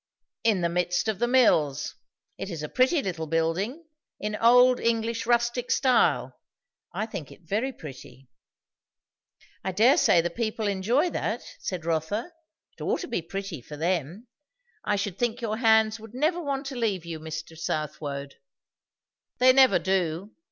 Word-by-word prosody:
"In 215 Hz, -5 st, +2 dB
the 170 Hz, -, +1 dB
midst 180 Hz, +3 st, 0 dB
of 215 Hz, -3 st, -1 dB
the 240 Hz, -, +2 dB
mills. 160 Hz, -, +3 dB, 0.5 s
It -, -, -4 dB
is 165 Hz, -4 st, -5 dB
a -, -, -3 dB
pretty 265 Hz, +4 st, +2 dB
little 165 Hz, -4 st, -3 dB
building 170 Hz, -, -1 dB, 0.3 s
in 210 Hz, 0 st, -3 dB
old 245 Hz, +3 st, +5 dB
English 230 Hz, 0 st, -1 dB
rustic 240 Hz, +1 st, +1 dB
style; 255 Hz, -3 st, +2 dB, 0.5 s
I 215 Hz, -, -2 dB
think 165 Hz, -, -7 dB
it -, -, -15 dB
very 215 Hz, +11 st, -1 dB
pretty." 135 Hz, -, -12 dB, 1.4 s
"I 190 Hz, -, -1 dB
dare 230 Hz, -, +5 dB
say 175 Hz, -, +5 dB
the 170 Hz, +1 st, 0 dB
people 220 Hz, +1 st, -2 dB
enjoy 225 Hz, -, +1 dB
that," -, -, -2 dB, 0.2 s
said 180 Hz, -4 st, -5 dB
Rotha. 170 Hz, -, -2 dB, 0.4 s
"It -, -, -15 dB
ought -, -, -1 dB
to 350 Hz, -, -5 dB
be 230 Hz, -, -2 dB
pretty, 195 Hz, -, -6 dB
for 150 Hz, +5 st, -10 dB
them. 175 Hz, -, -2 dB, 0.6 s
I 205 Hz, -, +1 dB
should 200 Hz, -2 st, -3 dB
think 240 Hz, -2 st, 0 dB
your 220 Hz, -2 st, -2 dB
hands 220 Hz, -1 st, +4 dB
would 225 Hz, +2 st, -12 dB
never 320 Hz, +6 st, +1 dB
want 280 Hz, -2 st, -3 dB
to 270 Hz, -, -6 dB
leave 205 Hz, -8 st, -1 dB
you, 165 Hz, -2 st, -6 dB
Mr. 160 Hz, +1 st, -7 dB
Southwode." 145 Hz, -3 st, -4 dB, 1.0 s
"They 255 Hz, +1 st, +6 dB
never 265 Hz, -1 st, +6 dB
do. 180 Hz, +1 st, -1 dB
210 Hz, 160 wpm, -26 LUFS, 165-240 Hz, 1.4 s, They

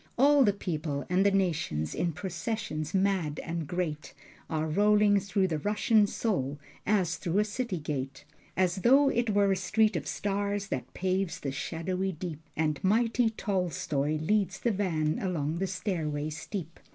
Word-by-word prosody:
All 285 Hz, +2 st, +6 dB
the 210 Hz, -, +4 dB
peoples 155 Hz, -7 st, -3 dB
and 185 Hz, +2 st, +4 dB
the 200 Hz, -, +5 dB
nations 160 Hz, -, 0 dB
in 170 Hz, -, 0 dB
processions 170 Hz, -2 st, -4 dB
mad 190 Hz, -6 st, +1 dB
and 165 Hz, -2 st, -4 dB
great, 165 Hz, -3 st, -3 dB, 0.3 s
Are 155 Hz, -1 st, -1 dB
rolling 205 Hz, +4 st, +4 dB
through 190 Hz, -1 st, 0 dB
the 155 Hz, -2 st, -1 dB
Russian 210 Hz, +4 st, +3 dB
Soul 145 Hz, -, -1 dB, 0.3 s
as 185 Hz, -5 st, +2 dB
through 175 Hz, +2 st, -1 dB
a 210 Hz, -, +4 dB
city 215 Hz, -2 st, -3 dB
gate: 140 Hz, -3 st, -4 dB, 0.3 s
As 185 Hz, 0 st, +2 dB
though 270 Hz, +8 st, +5 dB
it 240 Hz, -3 st, 0 dB
were 200 Hz, -1 st, +3 dB
a -, -, +3 dB
street 210 Hz, +3 st, +2 dB
of 160 Hz, -, -3 dB
stars 200 Hz, 0 st, -2 dB
that 130 Hz, -, -4 dB
paves 185 Hz, -1 st, -1 dB
the 135 Hz, -, -2 dB
shadowy 180 Hz, +7 st, -2 dB
deep. 160 Hz, -2 st, -6 dB, 0.2 s
And 155 Hz, -2 st, 0 dB
mighty 230 Hz, +4 st, +3 dB
Tolstoi 180 Hz, -8 st, -1 dB
leads 195 Hz, +4 st, +1 dB
the 235 Hz, -, +1 dB
van 165 Hz, -7 st, 0 dB
along 165 Hz, -4 st, -1 dB
the 195 Hz, -, 0 dB
stairway 160 Hz, -5 st, -2 dB
steep. 165 Hz, +2 st, -6 dB
185 Hz, 160 wpm, -29 LUFS, 155-205 Hz, 0.3 s, All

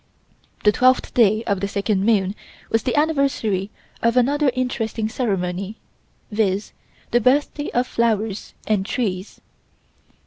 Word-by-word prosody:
The 210 Hz, -, +6 dB
twelfth 255 Hz, +4 st, +3 dB
day 220 Hz, -2 st, +4 dB
of 200 Hz, -4 st, -1 dB
the 200 Hz, -, -1 dB
second 200 Hz, -1 st, 0 dB
moon 200 Hz, -3 st, +2 dB, 0.4 s
was 225 Hz, -, +2 dB
the 245 Hz, -, -1 dB
anniversary 275 Hz, -10 st, +1 dB, 0.3 s
of 230 Hz, +1 st, +2 dB
another 280 Hz, +3 st, +3 dB
interesting 230 Hz, -3 st, -1 dB
ceremony, 195 Hz, -3 st, -2 dB, 0.5 s
viz.: 205 Hz, -1 st, 0 dB, 0.4 s
the 240 Hz, -, +3 dB
birthday 290 Hz, +4 st, +1 dB
of 245 Hz, +1 st, +1 dB
the -, -, -17 dB
flowers 220 Hz, -3 st, 0 dB
and 210 Hz, -3 st, +1 dB
trees. 195 Hz, -3 st, -3 dB
220 Hz, 130 wpm, -22 LUFS, 200-250 Hz, 0.5 s, The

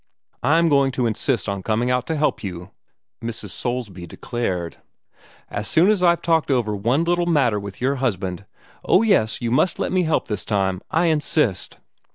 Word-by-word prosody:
"I'm 165 Hz, +6 st, +3 dB
going 140 Hz, -3 st, +3 dB
to 125 Hz, -1 st, 0 dB
insist 110 Hz, -1 st, -1 dB
on 100 Hz, -1 st, -3 dB
coming 115 Hz, +5 st, 0 dB
out 125 Hz, 0 st, 0 dB
to 160 Hz, -, -1 dB
help 150 Hz, -5 st, 0 dB
you," 90 Hz, -1 st, -7 dB, 0.5 s
Mrs. 110 Hz, -4 st, -4 dB
Soulsby 105 Hz, -5 st, -4 dB
declared, 90 Hz, -4 st, -4 dB, 0.7 s
"as 105 Hz, 0 st, -3 dB
soon 180 Hz, +6 st, +4 dB
as 205 Hz, -4 st, +1 dB
I've 170 Hz, -1 st, +3 dB
talked 165 Hz, -2 st, +1 dB
over 120 Hz, -6 st, +1 dB
one 120 Hz, +10 st, +1 dB
little 175 Hz, 0 st, +1 dB
matter 135 Hz, -10 st, +2 dB
with 100 Hz, -1 st, -8 dB
your 135 Hz, +3 st, 0 dB
husband. 100 Hz, -7 st, -2 dB, 0.4 s
Oh, 190 Hz, -, +4 dB
yes, 130 Hz, -, +2 dB
you 115 Hz, -, -1 dB
must 150 Hz, +8 st, +2 dB
let -, -, -2 dB
me 180 Hz, -3 st, +1 dB, 0.2 s
this 105 Hz, -2 st, -4 dB
time. 95 Hz, -3 st, -1 dB
I 165 Hz, +2 st, +1 dB
insist!" 150 Hz, -, 0 dB
120 Hz, 175 wpm, -22 LUFS, 100-160 Hz, 0.7 s, soon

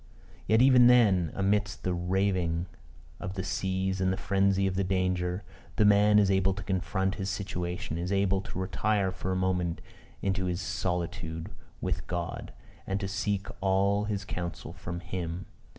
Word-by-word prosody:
Yet, 110 Hz, +4 st, +5 dB
even 125 Hz, -2 st, +7 dB
then, 100 Hz, -10 st, +5 dB
amidst 100 Hz, -1 st, 0 dB
the 90 Hz, -, 0 dB
raving 90 Hz, -1 st, 0 dB, 0.5 s
of 90 Hz, +1 st, -5 dB
the 95 Hz, -, -2 dB
seas 95 Hz, 0 st, -1 dB
and 95 Hz, 0 st, +2 dB
the 95 Hz, -, -1 dB
frenzy 100 Hz, 0 st, +2 dB
of 95 Hz, -, 0 dB
the 95 Hz, +1 st, 0 dB
danger, 90 Hz, 0 st, 0 dB, 0.3 s
the 105 Hz, -, +4 dB
man 105 Hz, +1 st, +6 dB
is 100 Hz, -2 st, +4 dB
able 95 Hz, 0 st, +2 dB
to 105 Hz, -, -6 dB
confront 95 Hz, 0 st, -1 dB
his 95 Hz, -, -2 dB
situation 90 Hz, -4 st, -3 dB
is 90 Hz, +2 st, -3 dB
able 100 Hz, -1 st, +2 dB
to 95 Hz, -, -8 dB
retire 95 Hz, +1 st, 0 dB
for 95 Hz, 0 st, -4 dB
a -, -, 0 dB
moment 90 Hz, -2 st, 0 dB, 0.4 s
into 95 Hz, -2 st, 0 dB
solitude 90 Hz, -1 st, -3 dB, 0.3 s
with -, -, -2 dB
God, 85 Hz, -1 st, -4 dB, 0.4 s
and 95 Hz, +1 st, -1 dB
to 100 Hz, -, -3 dB
seek 100 Hz, 0 st, -1 dB, 0.2 s
all 100 Hz, +2 st, +2 dB
his 105 Hz, -2 st, -3 dB
counsel 85 Hz, -3 st, -5 dB
from 85 Hz, +1 st, -6 dB
him! 90 Hz, 0 st, -4 dB
95 Hz, 160 wpm, -29 LUFS, 90-100 Hz, 0.5 s, even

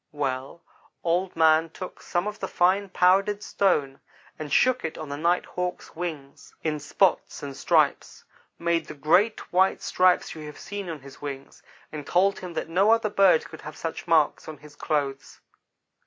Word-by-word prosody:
Well, 135 Hz, +2 st, -4 dB, 0.4 s
Old 180 Hz, +2 st, 0 dB
man 160 Hz, 0 st, +4 dB
took 180 Hz, +3 st, -9 dB
some 175 Hz, +1 st, -1 dB
of 210 Hz, +1 st, -5 dB
the 190 Hz, -, -3 dB
fine 190 Hz, +3 st, +2 dB
powdered 195 Hz, +3 st, +2 dB
stone 145 Hz, -9 st, 0 dB, 0.4 s
and 150 Hz, -2 st, -6 dB
shook 255 Hz, -, +3 dB
it 160 Hz, -, -4 dB
on 155 Hz, -2 st, -7 dB
the 140 Hz, -, -3 dB
Night 170 Hz, +4 st, +1 dB
hawk's 180 Hz, 0 st, -5 dB
wings 155 Hz, -5 st, -7 dB
in 155 Hz, -2 st, -1 dB
spots 160 Hz, +5 st, 0 dB
and 140 Hz, -1 st, -6 dB
stripes -, -, +1 dB, 0.3 s
made 170 Hz, -1 st, 0 dB
the 155 Hz, -, -8 dB
great 180 Hz, +11 st, +1 dB
white 190 Hz, +2 st, +3 dB
stripes 185 Hz, 0 st, +2 dB
you 155 Hz, -, -9 dB
have 150 Hz, -, -10 dB
seen 200 Hz, 0 st, -6 dB
on 160 Hz, -4 st, -6 dB
his 135 Hz, 0 st, -14 dB
wings, 140 Hz, -2 st, -7 dB, 0.3 s
and 150 Hz, -2 st, -7 dB
told 195 Hz, +3 st, +2 dB
him 180 Hz, -2 st, -7 dB
that -, -, -3 dB
no 185 Hz, +6 st, +2 dB
other 225 Hz, -2 st, +3 dB
bird 195 Hz, -5 st, +4 dB
could -, -, -11 dB
have 150 Hz, -, -9 dB
such 165 Hz, +1 st, -5 dB
marks 160 Hz, -3 st, +2 dB
on 155 Hz, -1 st, -7 dB
his 150 Hz, +1 st, -16 dB
clothes. 140 Hz, -4 st, -3 dB
165 Hz, 175 wpm, -25 LUFS, 150-185 Hz, 0.4 s, man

